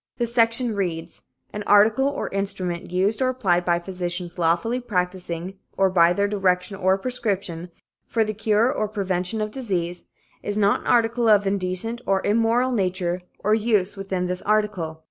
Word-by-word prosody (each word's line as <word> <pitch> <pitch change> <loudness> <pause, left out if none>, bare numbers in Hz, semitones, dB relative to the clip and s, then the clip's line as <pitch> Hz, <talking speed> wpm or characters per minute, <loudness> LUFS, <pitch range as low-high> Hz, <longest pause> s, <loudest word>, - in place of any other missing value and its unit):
This 235 -1 -1
section 230 0 +2
reads: 170 -4 -3 0.3
'An 210 - -4
article 215 +6 +5
or 285 - -2
instrument, 185 -3 -3
used 195 +6 +1
or 255 - +3
applied 190 -9 +1
by 175 -1 +2
physicians 175 0 -4
lawfully 175 +9 +1
practicing, 180 -4 -3 0.2
or 195 -1 +3
by 170 -2 +5
their 200 +3 +1
direction 190 -1 0
or 190 0 +2
prescription, 195 -7 -3 0.4
for 225 - +1
the 215 0 -3
cure 220 +4 +2
or 215 -6 -1
prevention 195 0 -2
of 215 0 -2
disease, 180 -8 -3 0.4
is 205 0 -3
not 205 -1 +3
an - - -10
article 235 -1 +3
of 205 -1 +5
indecent 195 +4 -2
or 195 -1 +1
immoral 230 +4 +2
nature 185 -4 -1 0.2
or 210 +1 +3
use, 210 -3 +1
within 190 -2 -3
this 180 0 -3
article. 205 -7 -1
195 Hz, 165 wpm, -23 LUFS, 180-220 Hz, 0.4 s, article